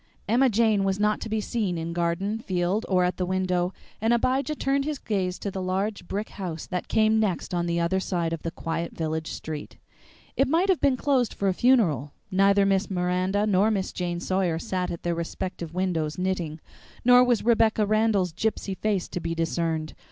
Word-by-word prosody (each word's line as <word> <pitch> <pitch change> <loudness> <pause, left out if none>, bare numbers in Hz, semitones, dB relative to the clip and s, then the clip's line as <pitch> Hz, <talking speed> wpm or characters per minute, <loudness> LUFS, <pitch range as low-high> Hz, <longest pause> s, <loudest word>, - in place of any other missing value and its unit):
Emma 250 +5 +4
Jane 220 -2 +3
was 195 0 0
not 210 0 +1
to 225 - -5
be 220 0 0
seen 210 -5 -1
in 165 +1 -4
garden, 175 +5 -1
field, 185 +1 -1
or 185 -2 +3
at 180 0 0
the 185 - -1
window, 185 -1 0 0.3
and 225 +2 +3
Abijah 260 +5 0
turned 275 0 0
his 300 0 -2
gaze 185 -6 -2
to 200 - -4
the 190 - -4
large 190 +1 -2
brick 210 +2 -3
house 175 -5 -5
that 180 -1 -4
came 220 0 +3
next 190 -5 -1
on 175 -1 0
the 170 0 0
other 170 +3 +1
side 170 -3 -1
of 165 - -4
the 165 - -3
quiet 165 +1 -4
village 160 -1 -3
street. 155 -2 -6 0.6
It 270 - +3
might 335 +7 +2
have 370 - +3
been 275 -3 +3
closed 260 -4 +1
for 200 - 0
a - - +1
funeral. 180 - +2 0.2
Neither 195 +1 +4
Miss 195 0 +1
Miranda 185 +2 0
nor 205 0 +3
Miss 195 -4 -1
Jane 175 -1 -2
Sawyer 185 -2 0
sat 180 +2 -2
at 170 - -6
their 175 - 0
respective 170 0 -5
windows 165 -5 -1
knitting, 180 -4 -2 0.4
nor 250 0 +8
was 245 -3 +1
Rebecca 225 -2 +3
Randall's 210 -4 +2
gypsy 210 -1 -2
face 200 -2 -1
to - - -4
be 165 -1 -3
discerned. 165 -1 -1
190 Hz, 195 wpm, -26 LUFS, 175-220 Hz, 0.6 s, nor